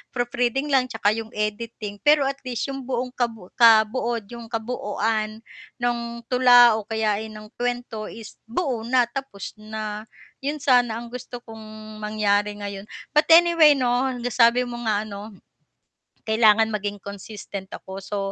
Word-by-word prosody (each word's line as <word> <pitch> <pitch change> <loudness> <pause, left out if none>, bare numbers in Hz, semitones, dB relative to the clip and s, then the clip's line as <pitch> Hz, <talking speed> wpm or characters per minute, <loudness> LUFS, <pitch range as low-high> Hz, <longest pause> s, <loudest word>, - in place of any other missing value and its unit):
proofreading 245 +3 -1
lang 260 -2 +3
tsaka 225 -4 +1
'yong 225 0 -4
editing. 210 -1 -4
Pero 295 -1 +6
at 275 0 -2
least 250 +2 -3
'yong 270 -2 -7
buong 250 -1 -2
kabu 225 -7 -4
kabuod 230 0 +4
'yong 235 -1 -8
kabuuan 220 -1 -2 0.3
ng 240 0 0 0.3
tula 245 -3 +7
o 210 - -10
kaya 220 -2 0
eh 220 - -6
ng 215 0 -11
kuwento 245 -3 -3
is 225 -1 -11
buo 255 0 -1
na 250 0 +4
tapos 240 -6 -7
na. 215 0 -6 0.3
'Yon 290 +2 -4
sana 245 -4 +3
ang 235 - -9
gusto 245 0 -8
kong 215 -1 -11
mangyari 210 -1 0
ngayon. 200 -1 -6 0.2
But 300 0 +3
anyway 335 -3 +7
'no, 255 0 +1
nasabi 245 +1 +3
mo 240 - -6
nga 210 -2 +1
ano, 210 0 -8 0.9
kailangan 220 0 +5
maging 205 -1 -3
consistent 200 -1 -8
ako, 190 +1 -8
so 205 +2 -4
225 Hz, 145 wpm, -23 LUFS, 215-245 Hz, 0.9 s, tula